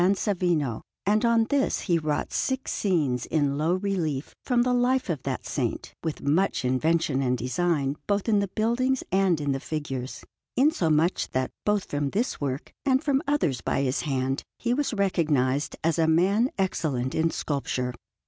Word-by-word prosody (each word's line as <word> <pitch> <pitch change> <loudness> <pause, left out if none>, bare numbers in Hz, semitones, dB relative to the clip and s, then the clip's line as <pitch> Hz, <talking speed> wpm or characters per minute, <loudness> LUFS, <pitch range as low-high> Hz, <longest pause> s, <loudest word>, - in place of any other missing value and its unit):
Savino, 175 - 0 0.2
and 210 +3 +2
on 235 -1 +4
this 280 -1 +1
he 170 -4 +1
wrought 150 -2 -2
six 265 0 -1
scenes 150 - 0
in 145 -3 +1
low 160 +5 +1
relief 175 -8 -2
from 245 -2 +2
the 250 0 +1
life 245 -3 +2
of 150 -6 -3
that 130 -1 -4
Saint, 125 -5 -3
with 160 -2 -3
much 155 0 +1
invention 140 +2 +1
and 125 -1 +1
design 140 +2 0
both 205 +1 0
in 210 -2 +4
the 200 - 0
buildings 240 +6 0
and 190 -4 +3
in 145 -1 -1
the 135 - -1
figures; 135 -4 -5 0.3
insomuch 175 - +2
that 130 0 0 0.2
both 210 -2 +2
from 145 -1 -2
this 225 - -1
work 140 -1 -3
and 265 -1 +2
from 275 -2 +2
others 170 - +1
by 135 - 0
his 130 0 0
hand 135 -1 -1 0.2
he 240 0 0
was 290 +2 0
recognized 150 - +1
as 165 0 +1
a 160 - +3
man 195 +9 +3
excellent 145 -9 -1
in 165 +1 +2
sculpture. 130 -5 -2
165 Hz, 165 wpm, -26 LUFS, 140-210 Hz, 0.3 s, on